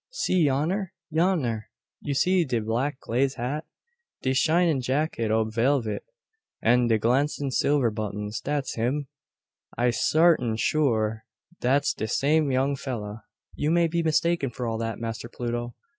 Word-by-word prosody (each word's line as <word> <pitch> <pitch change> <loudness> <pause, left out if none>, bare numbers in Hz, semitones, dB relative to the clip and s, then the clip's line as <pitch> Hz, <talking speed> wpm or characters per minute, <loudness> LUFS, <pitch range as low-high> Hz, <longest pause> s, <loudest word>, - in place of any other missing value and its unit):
See 185 - +1
yonner 170 +8 -1 0.2
yonner! 155 - +1 0.4
You 140 - -3
see 180 +5 +3
de 130 -6 -1
black 120 +6 -1
glaze 130 +3 0
hat, 135 +5 -3 0.6
de 130 - +1
shinin' 160 0 +3
jacket 130 -3 -1
ob 110 0 +1
velvet, 120 -1 +1 0.6
an 120 +1 +3
de 115 -1 +3
glancin' 135 +5 +1
silver 135 -3 +2
buttons 105 0 -4
dat's 145 -2 -2
him. 130 +5 -1 0.7
I 120 +1 +3
sartin 155 -3 +3
sure 110 -6 +1 0.4
dat's 140 +3 +2
de 110 - -4
same 150 +5 +2
young 135 +2 +1
fella." 110 -5 -6 0.3
"You 150 - -1
may 170 +1 +4
be 170 +1 0
mistaken 165 -2 +1
for 120 +1 -5
all 115 -1 -2
that, 115 -1 -3
Master 115 0 -5
Pluto. 120 0 -4
130 Hz, 145 wpm, -26 LUFS, 115-150 Hz, 0.7 s, may